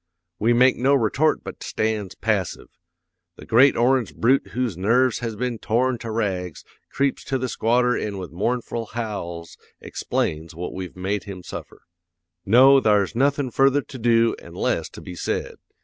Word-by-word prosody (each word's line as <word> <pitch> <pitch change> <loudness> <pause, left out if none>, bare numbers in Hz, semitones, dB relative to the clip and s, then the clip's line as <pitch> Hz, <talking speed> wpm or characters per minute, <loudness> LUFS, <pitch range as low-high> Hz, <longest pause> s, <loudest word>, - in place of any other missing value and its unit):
"'We 115 +3 +3
makes 125 +2 +4
no 135 +3 +4
retort 140 +6 +1
but - - -9
stands 110 -3 -2
passive. 105 -5 -2 0.7
The - - -12
great 130 +5 +5
orange 120 - +2
brute 130 +4 +2
whose 125 -6 -1
nerves 115 +6 +2
has 115 -2 -4
been 120 0 -3
torn 120 +2 0
to 115 - -6
rags 95 -6 -3 0.3
creeps 140 -1 0
to 135 - -1
the 130 0 -2
squatter 125 +1 +1
an' 105 -2 -3
with 90 -2 -7
mournful 115 +4 -2
howls 85 -7 -5 0.2
explains 80 +1 -3
what 90 +2 -5
we've 95 -2 -7
made 95 +2 -2
him 95 -3 -8
suffer. - - -9 0.6
"'No, 130 +6 +7
thar's 105 -4 +2
nothin' 140 +1 +1
further 135 +3 +3
to 130 - -10
do 115 0 +3
an' - - -13
less - - -1
to - - -11
be 90 - -8
said. 85 - -3
115 Hz, 165 wpm, -23 LUFS, 100-130 Hz, 0.7 s, No